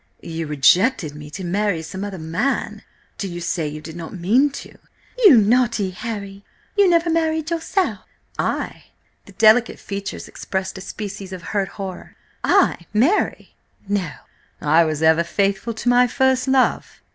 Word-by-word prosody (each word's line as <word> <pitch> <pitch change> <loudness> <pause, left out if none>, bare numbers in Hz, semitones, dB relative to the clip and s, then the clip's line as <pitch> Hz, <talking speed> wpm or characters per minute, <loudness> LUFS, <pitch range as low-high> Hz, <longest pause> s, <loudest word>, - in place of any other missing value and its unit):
"You 165 -1 -5
rejected 155 - +3
me 150 0 -10
to 150 +6 -7
marry 190 -1 -1
some 190 +5 -6
other 200 -2 -5
man: 165 +12 -2 0.4
do 200 - -2
you 175 -1 -6
say 170 -2 -2
you 150 +1 -7
did 160 +1 -9
not 170 +2 -7
mean 230 +12 +3
to?" 280 - -10 0.5
"You 330 -12 +9
naughty 225 -2 +2
Harry!... 200 -1 -6 0.3
You 405 -2 +5
never 335 -1 +3
married 320 -1 0
yourself?" 335 +3 -1 0.4
"I?" - - -2 0.4
The - - -14
delicate 225 +2 +4
features 200 -1 -6
expressed 190 0 -4
a - - -9
species 200 -1 -7
of 185 -2 -7
hurt 200 -2 -1
horror. 195 -3 -8 0.3
"I 370 - +2
marry? 285 - +1 0.3
No! 195 -4 -1 0.5
I 160 +3 +4
was 155 0 -2
ever 160 +1 +5
faithful 200 +5 -1
to 220 - -6
my 245 0 +5
first 265 +1 +1
love." 265 -1 +1
200 Hz, 155 wpm, -21 LUFS, 170-250 Hz, 0.5 s, You